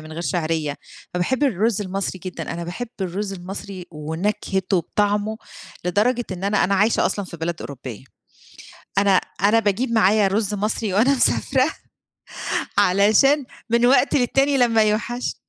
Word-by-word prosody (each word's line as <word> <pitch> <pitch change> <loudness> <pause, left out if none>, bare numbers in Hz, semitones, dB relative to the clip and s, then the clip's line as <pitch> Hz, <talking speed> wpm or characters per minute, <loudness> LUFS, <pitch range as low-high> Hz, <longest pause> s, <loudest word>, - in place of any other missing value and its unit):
من 155 0 -10
غير 170 +2 -5
شِعرية. 160 -4 -1 0.4
فباحب 255 +11 0
الرز 220 -3 +1
المصري 190 0 -3
جدًا، 185 -2 -5
أنا 170 0 -5
باحب 225 +8 -5
الرز 195 +2 -3
المصري 190 0 -7
ونكهته 185 +5 -2
وطعمه، 205 +4 0 0.5
لدرجة 225 +7 +1
إن 185 +1 -6
أنا 200 0 +2
أنا 200 - +1
عايشة 210 +4 +3
أصلًا 205 - -2
في 170 - -9
بلد 165 +1 -4
أوروبية. 130 -4 -8 0.9
أنا 200 0 +4 0.3
أنا 220 +3 +5
باجيب 225 +4 0
معايا 210 -2 +4
رز 205 +1 0
مصري 210 0 -2
وأنا 235 +8 +4
مسافرة 260 +1 +2 1.1
علشان 215 +10 +4 0.2
من 235 +1 +3
وقت 275 +3 +4
للتاني 275 +2 +2
لما 230 -3 +4
يوحش 230 +3 -1
205 Hz, 140 wpm, -22 LUFS, 180-230 Hz, 1.1 s, أنا